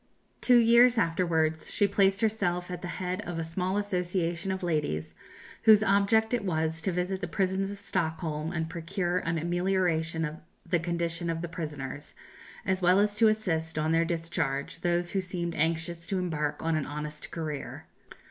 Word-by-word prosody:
Two 250 -1 +6
years 235 +1 +6
afterwards, 165 -4 +1
she 205 - +3
placed 195 0 +2
herself 180 -5 0
at 180 - -5
the - - -5
head 180 +1 -3
of 175 -1 -5
a 165 - -1
small 180 +4 -2
association 180 -2 -1
of 190 -1 -4
ladies 150 - -1 0.5
whose 215 -2 +7
object 220 +3 +3
it 240 -3 +1
was 160 -3 -1
to 190 - 0
visit 180 +2 -2
the 180 - -2
prisons 195 0 0
of 200 - -6
Stockholm, 160 -4 -2
and 165 -2 -2
procure 175 +2 -2
an 165 -1 -2
amelioration 170 -1 0
of 155 +1 -5 0.3
the 175 - +1
condition 170 0 -2
of 165 0 -2
the - - -2
prisoners, 150 -4 -6 0.5
as 190 0 0
well 180 +1 +5
as 205 +1 +2
to 225 - +6
assist, 165 -8 0
on 155 +1 +1
their 165 0 +4
discharge, 165 -3 -2
those 175 0 0
who 195 - 0
seemed 175 -2 -3
anxious 165 +1 -1
to 195 - -1
embark 155 -5 -2
on 165 0 +1
an 155 -3 -1
honest 150 0 -5
career. 155 -4 -5
175 Hz, 175 wpm, -29 LUFS, 160-190 Hz, 0.5 s, whose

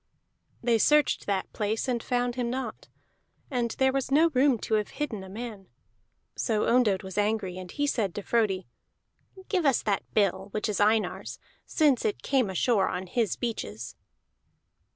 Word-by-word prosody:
They 230 -1 +3
searched 300 +5 +3
that 195 -2 -1
place 215 +3 -1
and 240 -2 0
found 245 0 0
him 245 -1 -2
not, 250 -3 -5 0.6
and 245 -3 0
there 265 0 +3
was 270 -1 -1
no 310 +5 +5
room 265 -1 +4
to - - -3
have 210 -1 +2
hidden 245 -10 -3
a 190 - -10
man. 210 -2 -7 0.7
So 215 -2 0
Ondott 225 -6 +3
was 190 +1 -4
angry, 205 -3 -1
and 185 -1 -8
he 290 - -1
said 215 -10 -1
to 205 - -4
Frodi: 200 -5 +1 0.8
"Give 370 -4 +1
us 275 -5 +3
that 200 -2 0
bill, 195 -2 +2
which 210 - 0
is 210 -3 -1
Einar's, 215 +1 +1 0.3
since 290 -6 +3
it 210 - -2
came 260 -7 +2
ashore 195 +2 +2
on 185 - -3
his 215 +1 0
beaches." 115 - -5
220 Hz, 165 wpm, -28 LUFS, 200-250 Hz, 0.8 s, no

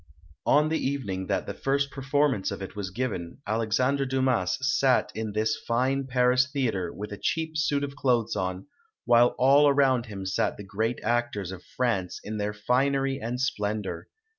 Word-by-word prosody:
On 150 +2 +4
the 160 - 0
evening 100 -10 -2
that - - -1
the - - -5
first 140 +1 0
performance 135 -5 +1
of - - -5
it 95 +1 -7
was 100 -2 -4
given, 95 -6 -4
Alexandre 115 +6 +1
Dumas 130 -8 +1
sat 130 0 +2
in 110 -1 -4
this 110 +1 +1
fine 130 +3 +1
Paris 125 +1 +3
theatre 110 -11 -1
with 105 +1 -7
a 105 - -5
cheap 160 -1 -1
suit 150 -2 +1
of 140 -1 -4
clothes 125 -7 +1
on, 95 -1 -3 0.4
while 120 0 +5
all 140 +3 +6
around 135 -4 +3
him 100 -3 -6
sat 95 - 0
the 105 - -8
great 110 +4 -2
actors 115 -5 -1
of 95 -1 -8
France 100 -8 -2
in 110 +1 -5
their 105 0 -1
finery 135 +5 +1
and 120 +1 -4
splen 105 -5 -1
dor. 95 - -6
120 Hz, 175 wpm, -27 LUFS, 105-135 Hz, 0.4 s, all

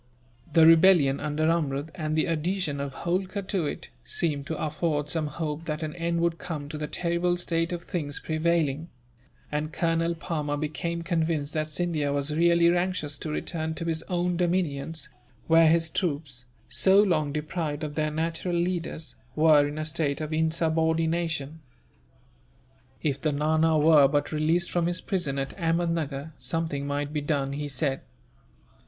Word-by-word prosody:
The 165 -2 +7
rebellion 165 -4 +6
under 150 +1 -1
Amrud, 155 -2 0
and 155 -3 -2
the 155 - +2
adhesion 165 -2 -1
of 140 0 -3
Holkar 185 +3 -1
to 180 -6 0
it, - - -6
seemed 145 - -2
to 160 - -3
afford 150 -1 -1
some 160 -2 0
hope 150 +1 -4
that 155 0 -3
an 155 -1 -3
end 170 0 -1
would 170 -1 0
come 150 -5 -5
to 155 - -5
the 150 - -3
terrible 175 +1 0
state 165 -1 -1
of 175 -1 -4
things 150 -7 -3
prevailing; 160 -1 0 0.6
and 150 +1 -2
Colonel 165 +1 0
Palmer 150 -3 -2
became 160 +3 -3
convinced 160 -4 -1
that 155 -1 -1
Scindia 155 -2 -1
was 145 +1 -1
really 170 +1 +4
anxious 175 -5 -1
to 155 - -5
return 160 +1 -3
to 165 - -4
his 165 -1 -1
own 175 -1 0
dominions, 165 -4 -1 0.4
where 165 0 +6
his 165 +1 +4
troops, 145 -7 -3 0.2
so 190 +1 +4
long 160 -8 +2
deprived 150 0 -3
of 150 -1 -4
their 155 0 0
natural 165 +3 -2
leaders, 170 -2 -2 0.2
were 155 -2 +5
in 145 +1 -6
a 155 - -2
state 155 -3 -1
of 155 0 -4
insubordination. 160 -1 0 1.4
If 140 -3 -1
the 155 - +1
Nana 155 +2 +2
were 150 -2 +6
but 145 +1 0
released 160 +3 +1
from 170 -1 +1
his 175 0 -1
prison 170 -8 -2
at 135 0 -3
Ahmednuggur, 165 -3 -1
something 160 -4 -2
might 145 +1 -2
be 150 - -1
done, 140 -2 -1
he 145 +1 -3
said. 135 -1 -1
160 Hz, 160 wpm, -27 LUFS, 150-170 Hz, 1.4 s, The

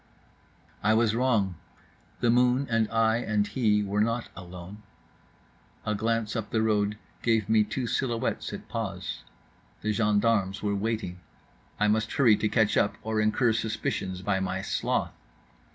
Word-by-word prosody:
I 110 +1 +3
was 110 -1 +3
wrong, 115 -7 +1 0.6
the 120 -1 +4
moon 125 +2 +3
and 115 -1 +2
I 115 0 +3
and 105 -3 0
he 105 -3 +1
were 100 +1 0
not 115 +2 0
alone…. 90 +2 -9 1.0
A 105 - 0
glance 115 +1 -1
up 110 -2 -3
the 110 -1 +1
road 105 -1 +1 0.2
gave 110 -3 +2
me 110 -1 +4
two 115 +5 -3
silhouettes 120 -1 -1
at - - -8
pause. 95 -6 -4 0.6
The 110 - +1
gendarmes 105 -1 +1
were 100 -1 +1
waiting. 105 -3 -2 0.6
I 105 - +3
must 110 +1 +1
hurry 120 -6 +5
to 110 0 0
catch 110 -2 +2
up 100 - +2
or 110 0 0
incur 110 +2 +2
suspicions 95 -4 -2
by 95 0 +1
my 95 0 -2
sloth. - - -1
110 Hz, 150 wpm, -27 LUFS, 105-115 Hz, 1.0 s, hurry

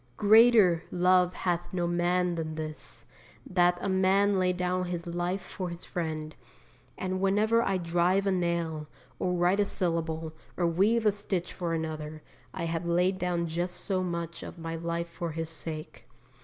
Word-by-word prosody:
'Greater 215 -5 +6
love 180 0 +3
hath 175 -1 -2
no 180 -2 -1
man 175 +1 +1
than 160 -2 -4
this, 155 -1 -6 0.4
that 175 -1 +3
a - - 0
man 190 +1 +3
lay 180 0 +3
down 180 0 -1
his 175 -1 -4
life 175 +2 -2
for 185 -3 -5
his 170 0 -7
friend,' 155 -3 -4 0.6
and 185 0 -2
whenever 210 +4 +3
I 195 -4 +1
drive 175 +3 +1
a 195 - +2
nail, 170 -4 -1 0.3
or 180 - 0
write 180 +3 +2
a 205 - +4
syllable, 165 -3 -2 0.2
or 175 - +1
weave 205 +7 +2
a 210 - +6
stitch 195 -3 -2
for 170 -2 -2
another, 155 -1 -5 0.3
I - - -5
have 165 +1 -2
laid 180 +2 +2
down 175 -2 0
just 175 +2 -2
so 185 +1 -1
much 170 -2 -4
of - - -8
my 165 0 -5
life 170 +1 -3
for 170 -1 -5
his 165 0 -3
sake. 160 -1 -6
175 Hz, 170 wpm, -29 LUFS, 165-185 Hz, 0.6 s, Greater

